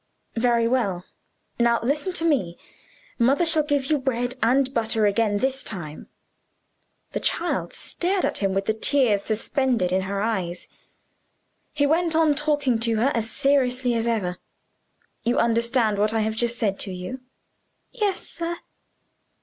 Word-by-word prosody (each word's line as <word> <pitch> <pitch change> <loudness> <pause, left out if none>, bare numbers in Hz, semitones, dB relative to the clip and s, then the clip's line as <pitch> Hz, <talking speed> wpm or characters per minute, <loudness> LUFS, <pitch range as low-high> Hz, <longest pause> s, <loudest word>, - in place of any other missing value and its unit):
"Very 235 0 +2
well. 205 -8 0 0.5
Now 235 0 +3
listen 295 +9 0
to 330 - 0
me. 200 - +1 0.6
Mother 270 +8 +3
shall 320 -1 +5
give 290 -2 0
you 300 +1 +1
bread 245 -2 -1
and 265 +3 +2
butter 220 -2 +1
again 205 0 +2
this 265 +4 -1
time." 155 -7 -6 1.0
The - - -2
child - - -1
stared 370 +2 -1
at - - -2
him 195 -2 0
with 195 0 0
the 220 - +1
tears 225 -2 +2
suspended 225 -2 0
in 190 +1 +2
her 195 +1 -3
eyes. 190 -5 -2 1.0
He 285 -1 +1
went 330 +2 +1
on 320 -2 +4
talking 290 -5 +1
to 230 0 +1
her 240 +6 +2
as 225 -1 -1
seriously 255 -2 +1
as 230 0 -1
ever. 195 -6 -1 0.8
"You 240 - +1
understand 235 -2 +2
what 215 +2 +1
I 220 - +2
have 220 0 -1
just 235 +1 0
said 200 -4 0
to 195 - -4
you?" 185 +8 -6 0.7
"Yes, 415 -5 -2
sir." 340 0 -4
235 Hz, 150 wpm, -24 LUFS, 215-275 Hz, 1.0 s, shall